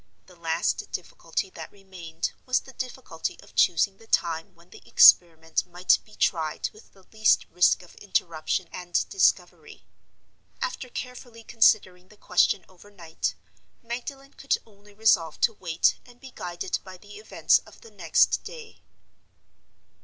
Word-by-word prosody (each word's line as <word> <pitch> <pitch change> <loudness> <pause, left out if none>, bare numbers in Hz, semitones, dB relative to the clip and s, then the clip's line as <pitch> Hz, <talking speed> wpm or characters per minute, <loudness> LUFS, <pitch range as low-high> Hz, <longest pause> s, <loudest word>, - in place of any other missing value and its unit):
The 180 - -18
last 165 0 -2
difficulty 180 +1 -4
that - - -9
remained 180 -5 -6 0.2
was 255 - +2
the 265 - -14
difficulty 250 -10 -6
of - - -19
choosing 195 +3 +3
the 225 - -18
time 165 +1 -1
when 170 +2 -23
the - - -14
experiment 160 -2 +5
might 175 +1 +2
be 215 - -19
tried 160 -3 -1
with 215 - -19
the 195 - -21
least 215 0 +3
risk 180 +1 +3
of 175 - -17
interruption 170 -3 -2
and 175 -1 -2
discovery. 390 - 0 0.7
After 380 - -4
carefully 245 -2 -8
considering 190 -5 +2
the 210 - -20
question 185 - +2
overnight, 180 -3 -6 0.5
Magdalen 270 +4 -7
could 275 - 0
only 205 -1 -21
resolve 185 -7 +2
to 230 - +3
wait 170 -5 +1
and 245 -1 -19
be 265 -1 -12
guided 175 -3 -4
by 185 -1 -11
the 205 +2 -14
events 215 - +2
of - - -18
the 460 - -15
next - - +2
day. 460 -2 -11
190 Hz, 145 wpm, -26 LUFS, 170-225 Hz, 0.7 s, experiment